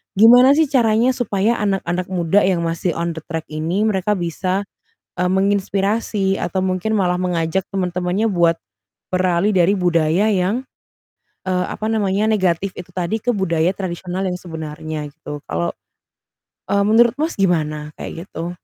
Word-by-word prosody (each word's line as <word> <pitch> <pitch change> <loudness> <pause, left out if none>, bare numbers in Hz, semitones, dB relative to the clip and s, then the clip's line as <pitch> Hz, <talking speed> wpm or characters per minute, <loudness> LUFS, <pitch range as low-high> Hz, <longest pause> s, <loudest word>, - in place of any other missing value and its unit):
Gimana 245 +6 +7
sih 320 0 +4
caranya 235 -1 +3
supaya 225 -2 0
anak-anak 185 -3 -1
muda 185 +1 +2
yang 180 -3 +1
masih 165 +1 -1
on 170 0 -1
the 160 -1 -7
track 165 -2 -4
ini 165 +7 -1
mereka 210 -1 +1
bisa, 185 +3 -2 0.5
eee, 180 0 +1
menginspirasi 195 +1 0
atau 190 - -2
mungkin 185 +3 -1
malah 180 -3 +1
mengajak 180 0 -1
teman-temannya 180 +3 0
buat 170 -2 +3 0.6
beralih 185 +2 +2
dari 185 +2 +4
budaya 175 +3 +2
yang, 200 +7 0 0.8
eee, 180 -1 +1
apa 215 - -5
namanya, 210 -1 +1
negatif 190 -2 +1
itu 180 0 -8
tadi 180 +4 -1
ke 245 - +2
budaya 170 -3 +1
tradisional 185 0 -4
yang 180 0 -2
sebenarnya 155 -3 -6
gitu. 145 -1 -8
Kalau, 85 +2 -1 1.0
eee, 200 0 +2
menurut 225 +2 +4
Mas, 315 +3 -1
gimana 155 -5 0
kayak 170 +3 -7
gitu? 170 -1 -5
185 Hz, 145 wpm, -20 LUFS, 170-205 Hz, 1.0 s, Gimana